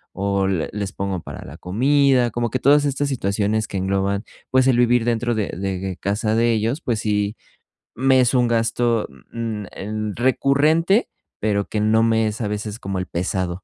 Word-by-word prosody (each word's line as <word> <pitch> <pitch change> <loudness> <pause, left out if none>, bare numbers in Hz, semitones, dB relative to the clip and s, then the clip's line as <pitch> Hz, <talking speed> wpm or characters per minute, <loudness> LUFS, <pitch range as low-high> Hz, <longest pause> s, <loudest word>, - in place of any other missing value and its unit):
o 100 0 0
le 95 -5 -1
les 100 -2 -3
pongo 95 -2 -3
para - - -9
la 70 +5 -10
comida, 130 +6 +2
como 120 -1 -2
que 130 - -1
todas 145 +3 +4
estas 140 0 -1
situaciones 105 -3 0
que 100 - -4
engloban, 100 +2 0 0.3
pues, 130 0 +4
el 125 - +4
vivir 120 -1 +3
dentro 120 0 0
de, 105 -2 -1
de 95 -1 -3
casa 105 +3 0
de 115 +1 +3
ellos. 115 +8 -1
Pues 115 -3 -1
sí 105 0 -1 0.6
me 130 +1 +4
es 125 0 +2
un 125 -2 +3
gasto, 115 0 +1 0.3
mm, 115 -2 -3
mm, - - -10
em, 105 +1 -4
recurrente, 150 - +2 0.3
pero 100 -1 +1
que 105 - -2
no 110 +1 +3
me 115 -1 +2
es 105 +1 -4
a 110 - -1
veces 105 +1 -4
como 95 -1 -4
el 90 - -4
pesado. 90 0 -3
110 Hz, 190 wpm, -21 LUFS, 100-125 Hz, 0.6 s, todas